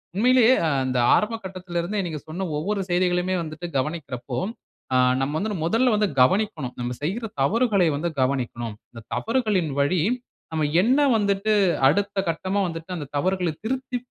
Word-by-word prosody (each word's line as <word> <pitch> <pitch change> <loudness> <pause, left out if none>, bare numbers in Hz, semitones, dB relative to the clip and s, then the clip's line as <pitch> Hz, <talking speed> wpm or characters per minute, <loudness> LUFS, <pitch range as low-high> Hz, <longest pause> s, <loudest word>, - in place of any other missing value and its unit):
உண்மையிலேயே 250 +3 +5 0.3
இந்த 130 -1 -1 0.2
ஆரம்ப 220 +2 +1
கட்டத்தில 185 -2 -6
இருந்தே, 200 +5 -2
நீங்க 160 -3 -4
சொன்ன 175 +5 -4
ஒவ்வொரு 200 +6 -1
செய்திகளுமே 180 +1 +1
வந்துட்டு 155 +2 -7
கவனிக்கிறப்போ, 130 -4 -3 0.6
ஆ - - +4 0.2
நம்ம 135 +2 -1
வந்து 215 +4 -2
முதல்ல 230 +8 +3
வந்து 210 0 +2
கவனிக்கனும், 155 - +1
நம்ம 120 0 -2
செய்ற 205 +10 -2 0.2
தவறுகளை 205 - +3
வந்து 165 +4 -1
கவனிக்கனும். 120 -4 -1 0.2
இந்த 115 - -10
தவறுகளின் 215 -8 0
வழி 150 +5 +2 0.5
நம்ம 160 -1 0 0.2
என்ன 250 +8 +3 0.2
வந்துட்டு 200 0 +1 0.4
அடுத்த 200 +6 0
கட்டமா 185 +5 -1
வந்துட்டு 165 +1 -7
அந்த 155 -4 -5
தவறுகள 185 +3 0
திருத்தி, 255 +2 -2
180 Hz, 145 wpm, -24 LUFS, 150-210 Hz, 0.6 s, உண்மையிலேயே